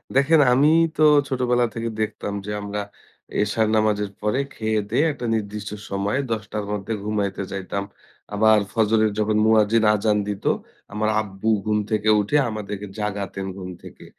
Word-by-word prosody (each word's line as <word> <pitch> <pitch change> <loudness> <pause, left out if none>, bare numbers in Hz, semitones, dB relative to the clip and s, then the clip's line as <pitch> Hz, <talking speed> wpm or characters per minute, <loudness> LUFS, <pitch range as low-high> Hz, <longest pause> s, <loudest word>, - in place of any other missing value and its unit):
দেখেন, 145 +4 +5
আমি 140 +4 +4 0.3
তো 155 - +3 0.3
ছোটবেলা 125 -2 +1
থেকে 115 0 -3
দেখতাম 105 -1 -3
যে 105 - -4
আমরা 105 0 -4 0.6
এশার 110 +1 +1
নামাজের 105 -2 +1
পরে 105 +5 0
খেয়ে-দেয়ে 110 +5 0
একটা 125 -3 -6
নির্দিষ্ট 105 -1 -4 0.2
সময় 100 +6 -1
১০ 110 -1 -1
টার 105 -1 -3
মধ্যে 105 +2 -3
ঘুমাইতে 100 -2 -2
যাইতাম। 100 +1 -3 0.5
আবার 110 +1 +5
ফজরের 110 -1 +2
যখন 105 0 +1
মুয়াজ্জিন 110 0 +4
আযান 105 0 +1
দিতো, 100 -1 0 0.4
আমার 110 0 0
আব্বু 100 +1 -4 0.2
ঘুম 105 0 +1
থেকে 110 0 +1
উঠে 105 +9 +1
আমাদেরকে 105 -2 -5
জাগাতেন 100 -2 -3
ঘুম 95 -1 -7
থেকে। - - -12
105 Hz, 150 wpm, -23 LUFS, 105-110 Hz, 0.6 s, দেখেন